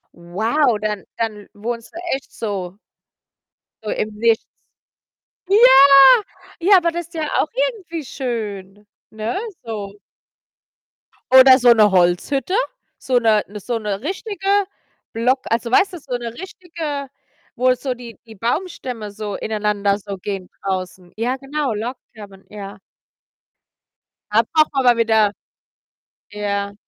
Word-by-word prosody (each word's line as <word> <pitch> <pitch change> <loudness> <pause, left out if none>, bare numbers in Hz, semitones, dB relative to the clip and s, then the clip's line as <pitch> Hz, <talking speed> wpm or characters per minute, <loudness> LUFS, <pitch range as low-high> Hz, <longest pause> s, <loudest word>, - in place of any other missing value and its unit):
Wow, 220 - 0
dann 210 -1 -3
dann 215 -3 -4
wohnst 230 +2 -6
du 335 - -11 0.2
echt 270 - -10
so 195 -4 -5 1.1
so 215 - -5
im 215 0 -2
Nichts. 225 +1 +2 1.0
Ja! 400 - +5 1.0
Ja, 385 +3 +6
aber 340 -2 +1
das 345 0 -6
ja 315 -2 -3
auch - - -1 0.2
irgendwie 340 -8 -8
schön, 210 -7 -5 0.3
ne, 220 - -3 0.2
so. 210 -3 -6 1.3
Oder 260 0 +9
so 245 -1 +6
'ne 215 -3 +4
Holzhütte, 185 - +1 0.5
so 255 -1 0
'ne 220 -3 +3
ne, 210 +1 -9
so 235 +4 -3
'ne 205 -1 -4
richtige 390 - -5 0.7
Block 250 +4 +1
also, 230 +1 -1
weißt 390 +7 +3
du, 355 - -6
so 265 -4 -5
'ne 235 -1 -6
richtige 325 -4 -6 0.5
wo 255 +1 +3
so 255 +1 -3
die 240 -4 -11
die 225 - -13
Baumstämme 240 - -4
so 205 -1 -5
ineinander 210 -2 -1
so 200 -1 -7
gehen 190 -1 -6
draußen. 185 -2 -4
Ja 240 +4 -1
genau, 275 -1 -3
Log 230 +5 -4 0.2
Cabin, 200 -3 -13
ja. 200 -1 -9 1.5
Da 215 +2 +5
braucht 310 -1 +3
man 270 -2 0
aber 240 -1 +5
wieder 220 -2 +3 1.0
ja. 200 -1 -3
230 Hz, 130 wpm, -20 LUFS, 205-270 Hz, 1.5 s, Oder